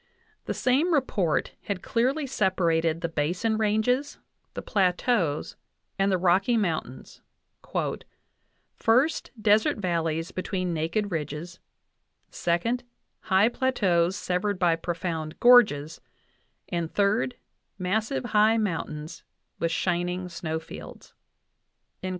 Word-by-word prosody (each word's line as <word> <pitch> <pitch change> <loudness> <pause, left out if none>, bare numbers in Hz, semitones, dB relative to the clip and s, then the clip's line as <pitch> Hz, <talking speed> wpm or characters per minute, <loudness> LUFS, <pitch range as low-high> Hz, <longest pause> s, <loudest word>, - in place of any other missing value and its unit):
The - - -3
same 295 +7 +2
report 200 - 0
had 200 -3 -3
clearly 265 +6 0
separated 170 -8 +1
the 170 - 0
Basin 175 +8 -1
Ranges, 220 +6 +1 0.4
the - - -5
Plateaus, 180 - 0 0.4
and 195 0 +3
the 185 - +3
Rocky 190 +6 +3
Moun 160 - -2 0.6
tains: - - -3 0.8
"first, 255 +8 +2
desert 215 0 +3
valleys 165 -3 -1
between 185 -1 -2
naked 165 +6 -1
ridges; 155 +1 -5 0.7
second, 190 +9 0 0.4
high 190 +2 +3
plateaus 190 -9 +1
severed 185 +1 -1
by 175 -2 +3
profound 165 -2 -4
gorges, 205 -11 +5 0.7
and, 170 -2 -3
third, 210 +5 +1 0.4
massive 220 +8 -1
high 220 -1 +4
mountains 165 -5 -3 0.4
with 165 - 0
shining 180 +1 -1
snow 160 -2 -3
fields" 160 - -11 0.9
(Uinta, 185 - -4
8). - - -2
185 Hz, 110 wpm, -26 LUFS, 165-220 Hz, 0.9 s, gorges